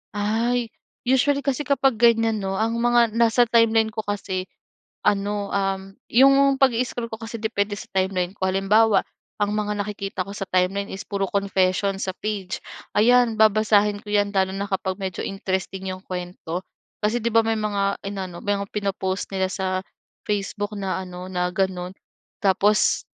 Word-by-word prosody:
Ay, 230 +3 0 0.3
usually 270 +2 +2
kasi 280 +1 -1
kapag 270 -5 +2
ganiyan 225 -2 +4
'no, 195 -1 -2
ang 225 +3 0
mga 240 -1 +4
nasa 235 +1 +4
timeline 225 -1 +3
ko 220 - -6
kasi 190 -2 -3 0.6
ano, 205 0 +1
um, 195 0 -2 0.2
yung 275 +2 +5
pag-i-scroll 245 -2 +1
ko - - -3
kasi 230 0 -6
depende 205 -2 -1
sa - - -9
timeline 185 0 0
ko. 190 - -7
Halimbawa, 200 +3 +3 0.4
ang 205 0 +2
mga 210 0 -1
nakikita 200 -2 -4
ko 200 - -7
sa 195 - -3
timeline 185 +2 +1
is 195 - -6
puro 200 -1 -2
confession 195 0 +1
sa 190 - -2
page. 200 -3 -3 0.4
Ayan, 240 +1 +4
babasahin 210 -1 +4
ko 210 - -10
'yan 205 -1 +2
lalo 190 0 +2
na 200 +1 -3
kapag 190 0 -2
medyo 190 -2 -3
interesting 190 -1 -3
yung 185 0 -8
kuwento, 180 -1 -5 0.4
kasi 215 +3 +1
di 235 - +1
ba 230 - +6
may 225 0 +1
mga 200 -2 -1
inano, 190 -3 -5
mga 200 -1 -1
pino-post 195 -2 -2
nila 190 -1 +1
sa 185 -1 -1 0.5
Facebook 205 0 -2
na 190 -1 -2
ano, 180 0 -8
na 180 0 0
ganun. 185 -1 -1 0.5
Tapos, 200 +2 +3
205 Hz, 160 wpm, -23 LUFS, 190-225 Hz, 0.6 s, ba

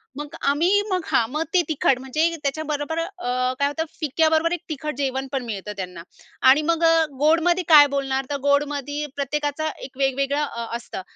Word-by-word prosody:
मग 295 0 -7 0.2
आम्हीही, 350 +8 +3
मग 365 -3 -1
हां, 225 - +2
मग 305 +2 -1
ते 360 - +5
तिखट, 270 -4 +1
म्हणजे 310 +6 0
त्याच्याबरोबर 300 +2 -2
अ 255 -9 -2
काय 280 - +3
होतं, 320 +3 -2
फिक्याबरोबर 315 +2 +2
1 350 - -1
तिखट 300 -2 -4
जेवण 270 -1 -2
पण 265 -2 -2
मिळतं 210 -2 -5
त्यांना. 180 -2 -6 0.5
आणि 285 +4 +6
मग 335 0 +1 0.4
गोडमध्ये 330 +4 +3
काय 295 -3 +8
बोलणार, 270 -1 -1
तर 285 - -1
गोडमध्ये 290 0 0
प्रत्येकाचा 290 +2 -2
1 260 -1 -10
वेगवेगळं 275 +2 0
अ 235 -5 -4
असतं. 235 - -8
290 Hz, 165 wpm, -23 LUFS, 270-315 Hz, 0.5 s, काय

